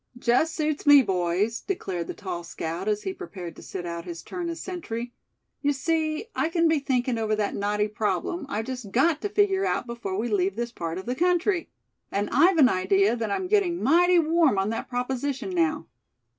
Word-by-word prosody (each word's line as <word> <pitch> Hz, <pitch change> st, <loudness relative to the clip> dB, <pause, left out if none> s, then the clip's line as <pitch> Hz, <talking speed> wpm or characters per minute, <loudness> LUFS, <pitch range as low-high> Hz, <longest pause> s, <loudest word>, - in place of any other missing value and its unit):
"Just 250 Hz, +7 st, +2 dB
suits 305 Hz, -1 st, -2 dB
me, 290 Hz, -2 st, +9 dB
boys!" 190 Hz, +3 st, 0 dB
declared 190 Hz, -, -3 dB
the -, -, -5 dB
tall 180 Hz, -4 st, -5 dB
scout, 170 Hz, +3 st, -5 dB
as 210 Hz, -1 st, 0 dB
he 385 Hz, -, -3 dB
prepared 185 Hz, -, -8 dB
to -, -, -12 dB
sit 180 Hz, -2 st, -6 dB
out 170 Hz, 0 st, -4 dB
his 170 Hz, -2 st, -7 dB
turn 350 Hz, -2 st, -4 dB
as 335 Hz, 0 st, -5 dB
sentry; 245 Hz, -11 st, -5 dB, 0.5 s
"you 290 Hz, -, +2 dB
see, 310 Hz, +4 st, -1 dB
I 320 Hz, -, +1 dB
can 335 Hz, 0 st, +2 dB
be 320 Hz, -2 st, +3 dB
thinking 255 Hz, -3 st, 0 dB
over 215 Hz, -1 st, +1 dB
that 210 Hz, -1 st, -1 dB
knotty 210 Hz, +1 st, 0 dB
problem 225 Hz, +9 st, -2 dB
I've 225 Hz, -4 st, -2 dB
just 250 Hz, -4 st, -6 dB
got 295 Hz, -, +2 dB
to 410 Hz, -, -2 dB
figure 400 Hz, -2 st, +2 dB
out 380 Hz, -, 0 dB
before 235 Hz, -6 st, -4 dB
we 225 Hz, +3 st, -1 dB
leave 195 Hz, -3 st, +1 dB
this 235 Hz, +1 st, -3 dB
part 165 Hz, -6 st, -4 dB
of 190 Hz, -, -6 dB
the 245 Hz, -, -1 dB
country. 355 Hz, +4 st, +1 dB, 0.4 s
And 205 Hz, +1 st, -1 dB
I've 340 Hz, +5 st, +5 dB
an 280 Hz, -5 st, +7 dB
idea 195 Hz, +1 st, +2 dB
that 225 Hz, -2 st, -3 dB
I'm 370 Hz, -, -1 dB
getting 370 Hz, -4 st, +1 dB
mighty 350 Hz, +5 st, +5 dB
warm 325 Hz, -7 st, +3 dB
on 195 Hz, +2 st, +1 dB
that 225 Hz, -, -4 dB
proposition 260 Hz, +5 st, -2 dB
now. 325 Hz, -4 st, 0 dB
250 Hz, 200 wpm, -26 LUFS, 205-330 Hz, 0.5 s, me